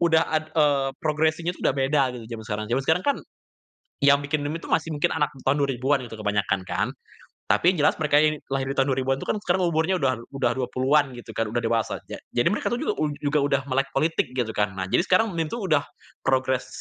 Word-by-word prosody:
udah 165 -2 +4
ad 155 0 +1
eee, 145 -3 +3 0.2
progressing-nya 160 +2 +1
itu - - -17
udah - - +3
beda 135 +2 +2
gitu 115 - -9
zaman 110 - -9
sekarang. 105 0 -2
Zaman 135 +2 +1
sekarang 160 +3 +3
kan, 285 - +3 0.9
yang 140 0 +6
bikin 145 0 -1
meme 160 +3 -4
itu - - -8
masih 160 0 +1
mungkin 145 - +1
anak 150 0 0
tahun 140 +2 +2
2000-an 135 +1 +1
gitu 115 - -9
kebanyakan 100 -2 0
kan, - - 0 0.6
tapi 180 - +4
jelas 150 -2 +3
mereka 150 -1 +3
yang 155 0 +3 0.2
lahir 135 -1 -1
di 135 - -3
tahun 135 0 +2
2000-an 130 0 0
itu - - -6
kan - - +1
sekarang 185 -1 +1
umurnya 160 +4 +1
udah 130 -4 +1 0.2
udah 135 - +1
20-an 130 +2 +1
gitu 120 - -10
kan, 115 -1 0
udah 120 +3 -1
dewasa 115 -1 0
aja. - - -8 0.2
Jadi 120 +4 +3
mereka - - -1
tuh - - +1
juga - - 0
ud 150 -1 0
juga 145 +1 +2
udah 140 -1 +2
melek 135 +1 +1
politik 155 +1 +1
gitu 120 -3 -1
kan. 105 -2 0
Nah 95 - -2
jadi - - +4
sekarang 195 +4 +3
meme 165 -2 -1
itu 230 - -4
udah 155 -7 +2 0.5
progres 130 -1 +1
140 Hz, 225 wpm, -25 LUFS, 130-155 Hz, 0.9 s, yang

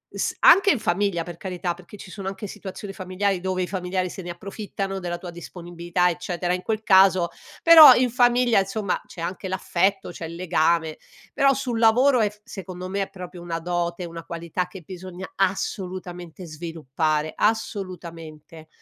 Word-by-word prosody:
S - - -1
anche 395 +2 +7
in 280 - +2
famiglia 185 -3 0
per 175 -1 -9
carità, 180 -2 -3
perché 175 +3 -14
ci 190 - -11
sono 195 -1 -7
anche 195 +2 -5
situazioni 195 +1 -8
familiari, 185 0 -2
dove 185 0 -1
i 180 - -3
familiari 185 -1 -2
se 190 - -7
ne 175 - -8
approfittano 195 +1 -5
della 175 -2 -4
tua 175 -1 -8
disponibilità 175 +1 -2
eccetera; 175 0 -2
in 180 - -2
quel 220 +2 -2
caso 190 -3 +5 0.3
però 320 -5 +11
in 250 -1 +2
famiglia, 245 -2 +4
insomma, 195 0 -2
c'è 170 - -10
anche 185 +3 -4
l'affetto, 190 +1 0
c'è 170 - -7
il 165 - -8
legame; 165 -2 +1 0.4
però 275 0 +4
sul 250 -4 -2
lavoro, 245 +4 +5
è 210 - +2
f 210 0 -20
secondo 185 -2 -8
me 200 +1 -1
è - - -8
proprio 180 -1 -9
una 170 -1 -4
dote, 175 +1 -2
una 165 0 -8
qualità 170 +1 -3
che 185 0 -11
bisogna 185 +1 -8
assolutamente 180 -2 -3
sviluppare, 155 -1 -2
assolutamente. 170 -7 -4
185 Hz, 170 wpm, -24 LUFS, 175-195 Hz, 0.4 s, però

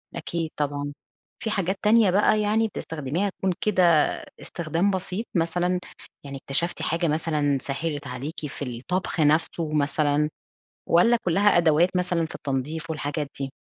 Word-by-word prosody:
أكيد 165 -2 -3
طبعًا، 145 0 -2 0.5
في 220 - -3
حاجات 195 -1 -1
تانية 215 -2 +5
بقى 210 +2 +3
يعني 220 +2 +2
بتستخدميها 160 0 -3
تكون 190 -1 -2
كده 180 -8 +4 0.3
استخدام 170 +3 -1
بسيط 190 +3 -2
مثلًا، 175 +1 +1 0.4
يعني 140 -1 -7
اكتشفتِ 150 +6 -1
حاجة 165 +1 0
مثلًا 150 -3 +1
سهِّلت 145 0 -3
عليكِ 140 +5 -5
في 140 0 -6
الطبخ 180 +6 -2
نفسُه 155 +1 +2
مثلًا، 150 0 +1 0.6
والَّا 230 +8 +5
كلَّها 195 +3 +4
أدوات 165 +1 +4
مثلًا 180 -2 +1
في 160 - -8
التنضيف 150 +4 -3
والحاجات 150 -1 -3
دي؟ 135 -1 -3
165 Hz, 135 wpm, -25 LUFS, 150-185 Hz, 0.6 s, تانية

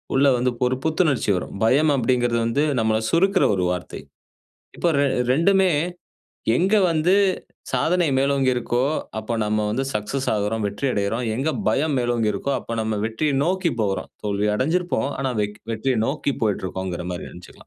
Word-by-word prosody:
உள்ள 140 +1 +4
வந்து 125 +1 +1
ஒரு 125 +1 +1
புத்துணர்ச்சி 155 - +1
வரும். 90 - -4
பயம் 145 +6 +4
அப்டிங்கிறது 120 -1 +1
வந்து 140 +6 +1 0.2
நம்மள 110 -1 +2
சுருக்குற 190 +3 +3
ஒரு 90 - 0
வார்த்தை. 90 0 -5 0.8
இப்ப 175 - +1
ரெ 145 - +3 0.3
2டுமே 190 +5 +3 0.9
எங்க 190 +5 +2 0.2
வந்து 165 +4 +2 0.6
சாதனை 175 0 +2
மேலோங்கி 135 -1 +2
இருக்கோ, 120 0 0 0.4
அப்ப 110 +2 -4
நம்ம 105 0 0
வந்து 130 +5 -1
சக்சஸ் 105 +6 -2
ஆகுறோம், 105 +1 -1
வெற்றி 105 +7 -3
அடையிறோம், 110 +4 -1
எங்க 140 +6 0 0.2
பயம் 145 0 +1
மேலோங்கி 120 -3 +1
இருக்கோ 120 +8 -2
அப்ப 115 0 -5
நம்ம 110 -1 -2
வெற்றிய 140 +7 -1
நோக்கி 185 0 0
போறோம். 100 -2 -2
தோல்வி 105 0 0
அடைஞ்சிருப்போம். 160 +3 0
ஆனா 135 -2 -1
வெக் 105 +1 -4
வெற்றியை 120 +1 0
நோக்கி 140 0 -1
போயிட்டுருக்கோம்ங்குற 95 -4 -2
மாரி 90 - -6
நெனைச்சுக்கலாம். 90 - -14
125 Hz, 155 wpm, -22 LUFS, 105-150 Hz, 0.9 s, உள்ள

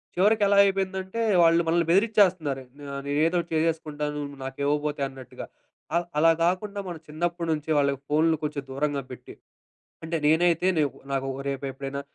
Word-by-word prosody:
చివరికెలా 205 +1 +3
అయిపోయిందంటే 190 +1 -2 0.2
వాళ్ళు 165 0 +5
మనల్ని 170 +1 +2
బెదిరిచ్చేస్తున్నారు. 185 -9 +2 0.3
ఆహ్, 140 - -4
నేనేదోటి 165 +4 +1
చేసేసుకుంటాను 155 -2 -1
నువ్వు 140 -1 -10
నాకివ్వబోతే 145 +2 -2
అన్నట్టుగా. 130 -2 -10 0.5
ఆహ్, 170 0 +1
అలా 165 +1 +6
గాకుండా 200 +4 0
మన 175 - -5
చిన్నప్పటి 170 +2 -3
నుంచి 150 0 -5
వాళ్ళకి 140 -2 +1
ఫోనులు 160 +2 +3
కొంచెం 150 -2 -3
దూరంగా 140 +1 -1
పెట్టి, 125 - -10 0.7
అంటే, 165 +1 -2
నేనైతే 170 +2 +3
నేపు 145 -3 0 0.2
నాకు 135 0 -1 0.2
రేపు 140 0 -3
ఎప్పుడైనా 135 +1 -5
160 Hz, 140 wpm, -26 LUFS, 145-175 Hz, 0.7 s, అలా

